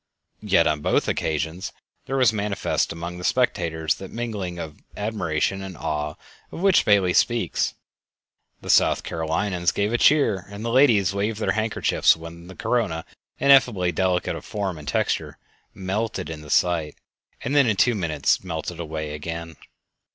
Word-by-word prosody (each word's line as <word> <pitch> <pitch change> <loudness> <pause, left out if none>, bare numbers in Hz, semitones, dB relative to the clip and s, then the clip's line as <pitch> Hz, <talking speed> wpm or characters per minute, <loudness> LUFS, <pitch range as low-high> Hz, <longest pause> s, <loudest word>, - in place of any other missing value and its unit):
Yet - - +3
on 75 -1 +1
both - - +1
occasions 80 +4 -2 0.4
there 135 - -1
was 125 -4 +4
manifest 105 -1 -1
among 85 +1 -6
the - - -8
spectators 85 - +1
that 95 - -7
mingling 105 -7 -4
of 80 -3 -7 0.2
admiration 95 -3 -1
and 95 -2 -8
awe 75 0 -3 0.4
of - - -7
which 195 -1 +4
Bailey 100 -4 +4
speaks. 120 +4 +1 0.9
The - - 0
South - - +4
Carolinians 85 +2 -1
gave 105 +3 -1
a 120 - +1
cheer 110 -11 +3
and 100 +2 -7
the 115 - -1
ladies 115 -8 +4
waved 105 +2 -1
their - - +1
handkerchiefs 110 -5 +2
when 85 +1 -10
the 95 - -11
corona, 95 -10 -1 0.3
ineffably 125 -10 +4
delicate 90 +1 0
of - - -8
form 95 -6 -4
and 75 - -12
texture, - - -1 0.4
melted 95 -3 -3
into 75 -1 -9
sight 80 -2 +1 0.5
and 135 +4 -2
then 140 -3 +5
in 110 - +2
two 120 +5 +3
minutes 80 -8 0
melted 85 -1 -5
away 80 -2 -4
again. 85 +2 -6
95 Hz, 155 wpm, -24 LUFS, 80-110 Hz, 0.9 s, then